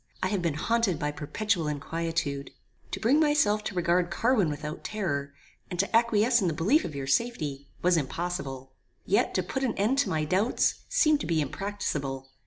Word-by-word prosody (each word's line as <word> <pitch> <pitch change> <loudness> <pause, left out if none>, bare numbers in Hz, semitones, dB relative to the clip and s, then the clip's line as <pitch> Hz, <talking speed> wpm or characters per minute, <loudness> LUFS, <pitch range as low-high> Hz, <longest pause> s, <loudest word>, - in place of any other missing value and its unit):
I 185 - +2
have 200 -2 0
been 165 -4 0
haunted 225 +1 +1
by 150 0 -1
perpetual 165 +4 -1
inquietude. 150 -1 -2 0.4
To - - -4
bring 255 +7 +3
myself 290 -9 +3
to 205 - -4
regard 175 0 +2
Carwin 210 0 +2
without 150 +1 -5
terror, 145 -10 -2 0.4
and 175 - -5
to 200 +4 +1
acquiesce 235 +1 +4
in 185 - +1
the 160 - -1
belief 210 - +3
of 150 - -6
your 140 -1 -3
safety, 145 - -1 0.2
was 180 -1 +4
impossible. 140 -4 -4 0.3
Yet - - +1
to - - +2
put 265 - -3
an 245 -4 0
end 225 +7 +1
to 280 - +2
my 155 -1 0
doubts, 190 +9 +1
seemed 310 -12 +4
to - - -4
be 165 -2 +1
impracticable. 145 -5 -3
175 Hz, 185 wpm, -28 LUFS, 150-220 Hz, 0.4 s, acquiesce